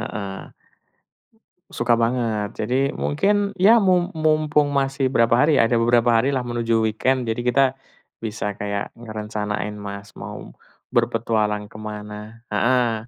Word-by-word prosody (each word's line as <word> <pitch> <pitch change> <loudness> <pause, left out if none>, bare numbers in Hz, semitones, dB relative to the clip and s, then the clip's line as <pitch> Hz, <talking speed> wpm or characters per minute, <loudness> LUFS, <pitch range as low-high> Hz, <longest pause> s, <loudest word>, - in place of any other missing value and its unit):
Heeh. 100 -3 -6 1.2
Suka 120 0 +1
banget. 115 -3 0 0.2
Jadi, 135 +2 +1
mungkin, 200 +6 +1
ya, 205 +5 +7
mum 180 -4 +3
mumpung 155 -1 +2
masih 135 -1 0
berapa 115 -2 +3
hari, 145 +5 +4
ada 115 +1 +3
beberapa 120 +1 +3
hari 120 +5 +2
lah 130 - -1
menuju 115 -1 0
weekend. 125 +4 +1
Jadi, 115 +1 -1
kita 135 +1 +3 0.5
bisa 105 -2 -3
kayak 100 0 -3
ngerencanain, 105 -2 -4
Mas, 100 0 -8
mau - - -8 0.4
berpetualang 110 -3 0
ke - - -11
mana? 105 +1 -8
Heeh. 115 +1 +1
115 Hz, 130 wpm, -22 LUFS, 105-135 Hz, 1.2 s, ya